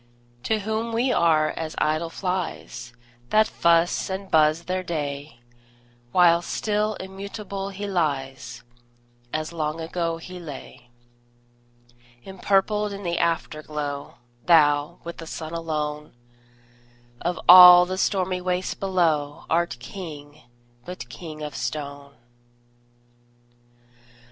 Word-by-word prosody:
To 220 Hz, -1 st, +1 dB
whom 220 Hz, +2 st, -2 dB
we 245 Hz, +3 st, +1 dB
are 155 Hz, -5 st, +3 dB
as 160 Hz, -1 st, -5 dB
idle 155 Hz, +2 st, 0 dB
flies, 175 Hz, -10 st, -4 dB, 0.4 s
That 215 Hz, 0 st, +5 dB
fuss 170 Hz, +2 st, +2 dB
and 190 Hz, 0 st, -5 dB
buzz 155 Hz, +1 st, +4 dB
their 185 Hz, +1 st, -2 dB
day; 145 Hz, -6 st, -5 dB, 0.7 s
While 170 Hz, 0 st, +5 dB
still 210 Hz, +3 st, -1 dB
immutable 195 Hz, +1 st, -6 dB
he 200 Hz, +1 st, -6 dB
lies, 135 Hz, -9 st, -2 dB, 0.7 s
As 155 Hz, +2 st, -3 dB
long 155 Hz, -1 st, -2 dB
ago 165 Hz, 0 st, -2 dB
he 180 Hz, +2 st, -9 dB
lay. 145 Hz, -6 st, -10 dB, 1.4 s
Empurpled 200 Hz, +2 st, 0 dB
in 200 Hz, 0 st, -7 dB
the 170 Hz, -1 st, -1 dB
Afterglow, 150 Hz, -3 st, -3 dB, 0.3 s
Thou, 150 Hz, -1 st, +4 dB
with 170 Hz, 0 st, -7 dB
the 165 Hz, -, -9 dB
Sun 160 Hz, 0 st, -6 dB
alone, 150 Hz, -3 st, -4 dB, 1.1 s
Of 175 Hz, +1 st, -2 dB
all 180 Hz, 0 st, +11 dB
the 185 Hz, +1 st, -4 dB
stormy 185 Hz, -2 st, 0 dB
waste 180 Hz, 0 st, -2 dB
below, 160 Hz, -7 st, 0 dB
Art 170 Hz, -4 st, +1 dB
King, 150 Hz, 0 st, -9 dB, 0.4 s
but 180 Hz, -9 st, -8 dB
king 155 Hz, +5 st, -8 dB
of 150 Hz, -1 st, -5 dB
stone! 140 Hz, -1 st, -5 dB
170 Hz, 110 wpm, -24 LUFS, 150-185 Hz, 1.4 s, all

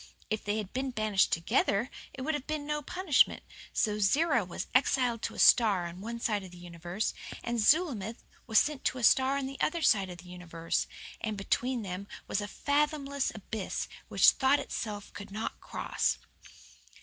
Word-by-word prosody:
If 215 Hz, -, -1 dB
they 205 Hz, +1 st, -1 dB
had 210 Hz, -3 st, -5 dB
been 265 Hz, +2 st, -1 dB
banished 215 Hz, -5 st, +2 dB
TOGETHER 200 Hz, +6 st, +1 dB, 0.3 s
it 260 Hz, -, -6 dB
would 315 Hz, +3 st, 0 dB
have 290 Hz, -2 st, -4 dB
been 305 Hz, -1 st, -3 dB
no 300 Hz, 0 st, -2 dB
punishment; 330 Hz, -1 st, +2 dB, 0.3 s
so 210 Hz, -1 st, 0 dB
Zerah 245 Hz, +4 st, +3 dB
was 180 Hz, -, -5 dB
exiled 250 Hz, -3 st, +2 dB
to -, -, -4 dB
a -, -, -10 dB
star 205 Hz, -7 st, +5 dB
on 170 Hz, +2 st, -7 dB
one 235 Hz, +2 st, -5 dB
side 210 Hz, -3 st, 0 dB
of 190 Hz, -, -10 dB
the 180 Hz, -, -13 dB
universe, 175 Hz, +3 st, -4 dB, 0.3 s
and 235 Hz, 0 st, -1 dB
Zulamith 230 Hz, -, +2 dB, 0.2 s
was 220 Hz, -2 st, +2 dB
sent 295 Hz, +1 st, +2 dB
to -, -, +1 dB
a 250 Hz, -, -5 dB
star 265 Hz, +4 st, +5 dB
on 275 Hz, -, -2 dB
the 270 Hz, +1 st, -7 dB
other 330 Hz, +1 st, 0 dB
side 195 Hz, -8 st, +4 dB
of 180 Hz, -, -8 dB
the 180 Hz, +1 st, -13 dB
universe; 170 Hz, -2 st, -3 dB, 0.4 s
and 215 Hz, -2 st, -2 dB
between 240 Hz, +4 st, -1 dB
them 190 Hz, +1 st, -5 dB, 0.2 s
was 205 Hz, -, -1 dB
a 205 Hz, -, -4 dB
fathomless 285 Hz, +1 st, 0 dB
abyss 215 Hz, -1 st, -4 dB, 0.2 s
which -, -, +6 dB
thought 270 Hz, +1 st, +3 dB
itself 210 Hz, -7 st, -5 dB
could 205 Hz, -, -8 dB
not 215 Hz, +3 st, -4 dB
cross. -, -, -1 dB
225 Hz, 185 wpm, -30 LUFS, 195-275 Hz, 0.4 s, which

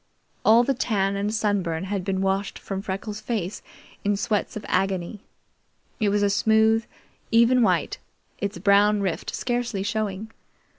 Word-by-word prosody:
All 230 Hz, +2 st, +6 dB
the 275 Hz, -, +1 dB
tan 200 Hz, -6 st, 0 dB
and 200 Hz, +1 st, -1 dB
sunburn 195 Hz, -6 st, -1 dB
had 195 Hz, 0 st, -3 dB
been 190 Hz, 0 st, -1 dB
washed 195 Hz, +1 st, -1 dB
from 195 Hz, -1 st, -5 dB
Freckles' 205 Hz, +2 st, -5 dB
face 210 Hz, -4 st, -3 dB, 0.4 s
in 205 Hz, 0 st, +1 dB
sweats 215 Hz, -1 st, -1 dB
of 210 Hz, -, -8 dB
agony. 190 Hz, +1 st, -1 dB, 0.8 s
It 215 Hz, -3 st, +2 dB
was 205 Hz, 0 st, +1 dB
a 200 Hz, -, +3 dB
smooth, 220 Hz, +2 st, +3 dB, 0.4 s
even 235 Hz, +2 st, +4 dB
white, 225 Hz, -, +1 dB, 0.4 s
its 200 Hz, -2 st, -3 dB
brown 205 Hz, +2 st, +4 dB
rift 190 Hz, -4 st, -2 dB
scarcely 240 Hz, -5 st, -2 dB
showing. 215 Hz, 0 st, -3 dB
205 Hz, 145 wpm, -24 LUFS, 195-220 Hz, 0.8 s, All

